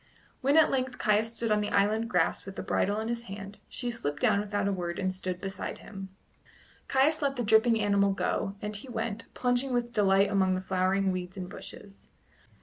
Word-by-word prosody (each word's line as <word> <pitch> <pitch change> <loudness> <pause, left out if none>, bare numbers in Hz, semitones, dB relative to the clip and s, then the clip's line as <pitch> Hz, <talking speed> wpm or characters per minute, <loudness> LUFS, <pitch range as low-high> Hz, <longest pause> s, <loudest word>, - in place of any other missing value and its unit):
When 280 +3 +3
at 320 - +6
length 255 -1 -1
Caius 215 +2 +1
stood 230 -2 -1
on 210 0 +3
the 210 - -2
island 215 +3 +2
grass 180 -5 +1
with 195 0 -9
the - - -5
bridle 205 +2 0
in 220 - -3
his 235 0 -3
hand, 200 0 -7
she 245 -1 -3
slipped 145 -11 -3
down 200 - +3
without 205 -1 -1
a 200 - +1
word 175 -2 -3
and 185 -1 -1
stood 185 -1 -4
beside 195 -1 -5
him. 195 -2 -9 0.8
Caius 290 +4 +3
let 280 -1 +1
the 245 - -1
dripping 220 +1 +4
animal 200 -1 +3
go, 195 0 -1
and 210 0 -3
he 230 +6 -7
went, 230 -2 -3
plunging 250 +1 +1
with 240 -1 -1
delight 195 -1 +4
among 190 -2 +3
the 185 - -2
flowering 190 +1 +1
weeds 185 0 -5
and 180 -1 -4
bushes. 200 +1 -10
205 Hz, 205 wpm, -29 LUFS, 195-235 Hz, 0.8 s, at